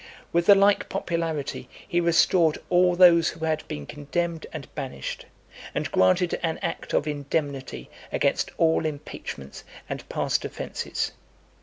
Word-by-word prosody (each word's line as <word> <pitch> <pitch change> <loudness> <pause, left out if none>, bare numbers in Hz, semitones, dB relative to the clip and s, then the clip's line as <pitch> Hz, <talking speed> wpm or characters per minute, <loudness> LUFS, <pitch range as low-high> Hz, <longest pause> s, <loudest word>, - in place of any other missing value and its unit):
With 170 0 +2
the 200 - +10
like 200 +1 +3
popularity 165 -6 -3 0.2
he 175 -2 +1
restored 170 -1 +4
all 180 0 +4
those 170 -2 +7
who 160 0 -5
had 155 -1 -1
been 75 -1 -5
condemned 160 - -3
and 150 -5 -7
banished, 130 - -5 0.5
and - - -2
granted 95 - +3
an 165 -2 -1
act 165 - -4
of 150 - +2
indemnity 140 - -3 0.2
against - - +1
all 160 -1 +3
impeachments 105 - -7 0.2
and - - -6
past - - 0
offences. - - -3
160 Hz, 135 wpm, -25 LUFS, 145-170 Hz, 0.5 s, the